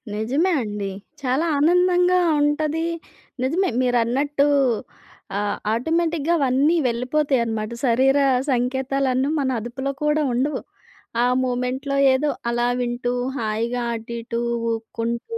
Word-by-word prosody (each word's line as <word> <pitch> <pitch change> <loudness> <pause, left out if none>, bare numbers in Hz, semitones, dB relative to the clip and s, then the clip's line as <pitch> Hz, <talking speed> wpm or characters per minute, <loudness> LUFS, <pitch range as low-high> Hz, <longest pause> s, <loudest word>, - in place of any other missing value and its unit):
నిజమే 270 - +1
అండి. 205 -3 -4 0.3
చాలా 265 +5 0
ఆనందంగా 360 +3 +4 0.2
ఉంటది. 305 +2 0 0.6
నిజమే 340 +9 +1
మీరన్నట్టూ 255 +4 +1 0.9
ఆహ్, 205 0 -1
ఆటోమేటిక్‌గా 325 +5 0
అవన్నీ 275 +4 +2
వెళ్ళిపోతాయనమాట. 235 -3 0
శరీర 260 +4 +3 0.3
సంకేతాలన్నీ 265 +1 0
మన 270 -2 0
అదుపులో 265 +4 -4
కూడా 300 +1 +2
ఉండవు. 265 +5 0 0.6
ఆ - - +4 0.2
మూమెంట్‌లో 255 +2 -2 0.2
ఏదో 290 +3 +1 0.2
అలా 240 0 +1
వింటూ 245 0 -2 0.2
హాయిగా 230 +2 -2
అటు 230 +1 -7
ఇటు 235 0 -4 0.3
ఉక్కుంటూ 235 - -4
260 Hz, 100 wpm, -22 LUFS, 235-295 Hz, 0.9 s, ఆనందంగా